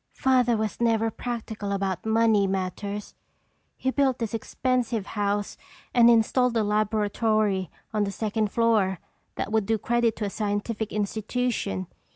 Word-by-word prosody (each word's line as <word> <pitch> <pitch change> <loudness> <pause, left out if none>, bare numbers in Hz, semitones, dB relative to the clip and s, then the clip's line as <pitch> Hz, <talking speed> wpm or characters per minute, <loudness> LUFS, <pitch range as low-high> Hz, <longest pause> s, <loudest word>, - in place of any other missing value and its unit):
"Father 250 -3 +3
was 215 +1 -3
never 225 -1 +2
practical 220 -4 -5
about 195 0 -2
money 220 -2 +3
matters. 195 +2 -3 0.6
He 260 - 0
built 270 -2 +2
this 230 -2 -3
expensive 240 -2 -1
house 205 -1 -2 0.4
and 235 -1 +7
installed 235 +1 +3
a 220 - +2
laboratory 210 -2 +1 0.2
on 210 -1 +2
the 200 - -3
second 215 0 -1
floor 215 -5 +2 0.4
that - - -3
would 220 -3 +1
do 225 0 +2
credit 235 0 +1
to 210 - -3
a - - -1
scientific 210 +1 -2
institution. 210 - -2
220 Hz, 140 wpm, -26 LUFS, 205-230 Hz, 0.6 s, and